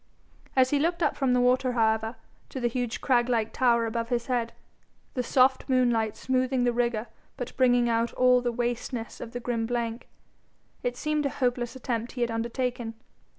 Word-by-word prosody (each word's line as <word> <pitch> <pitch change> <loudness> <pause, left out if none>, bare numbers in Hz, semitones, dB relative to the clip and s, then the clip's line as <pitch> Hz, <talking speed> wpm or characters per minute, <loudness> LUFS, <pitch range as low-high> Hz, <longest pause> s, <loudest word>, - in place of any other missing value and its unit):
As 260 -1 +4
he 290 - +3
looked 340 +3 0
up 295 - +1
from 265 -3 +1
the 250 - +3
water, 250 +1 +2
however, 220 0 +1 0.3
to 265 - -5
the 240 - +1
huge 240 -1 -3
crag 245 -2 +2
like 225 -3 0
tower 235 -2 +3
over 230 +1 -1
his 235 0 -1
head, 240 -3 -1 0.6
the 250 - -1
soft 260 +2 +3
moonlight 240 -4 +2
smoothing 255 0 0
the 245 0 +2
rigour 235 -2 0 0.3
but 250 -2 -6
bringing 245 -2 +4
out 230 0 +1
all 250 0 +4
the 245 -1 0
wasteness 240 0 -3
of 230 - -7
the 245 - -4
grim 230 -2 -2
blank, 235 0 -3 0.7
it 245 0 -2
seemed 300 0 0
a - - -2
hopeless 245 -2 -1
attempt 240 -2 -3
he 250 - -5
had 235 -1 +1
undertaken. 235 0 -2
245 Hz, 185 wpm, -27 LUFS, 235-255 Hz, 0.7 s, As